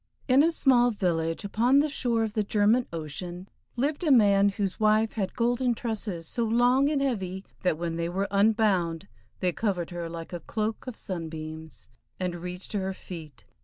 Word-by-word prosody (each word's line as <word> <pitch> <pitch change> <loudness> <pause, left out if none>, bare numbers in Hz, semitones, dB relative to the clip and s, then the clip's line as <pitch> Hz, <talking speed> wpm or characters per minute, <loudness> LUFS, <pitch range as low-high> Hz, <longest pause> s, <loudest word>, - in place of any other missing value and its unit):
In 265 +1 +6
a 330 +3 +4
small 250 -6 +4
village 170 -5 -1
upon 235 +6 +3
the 290 +2 +4
shore 235 -5 0
of 220 -2 -3
the 215 - +1
German 215 +4 +2
Ocean 175 +3 -6 0.3
lived 285 +7 -1
a 320 - +1
man 205 -6 +5
whose 200 -1 -3
wife 215 +1 +3
had 195 -4 -3
golden 245 +1 +1
tresses 210 -8 -4
so 235 - -1
long 245 +5 +3
and 285 -2 +1
heavy 190 -7 -2 0.2
that 180 -4 +1
when 165 0 -3
they 170 0 -1
were 195 +3 -1
unbound 200 -4 +2 0.3
they 180 -1 +2
covered 180 -3 -2
her 170 -1 -4
like 165 +1 -7
a 175 - -3
cloak 215 +8 -3
of 250 - -5
sunbeams, 160 -4 -6 0.3
and 180 -2 -2
reached 180 +2 -6
to 205 - 0
her 190 0 -3
feet. 160 -6 -10
200 Hz, 180 wpm, -27 LUFS, 175-235 Hz, 0.3 s, In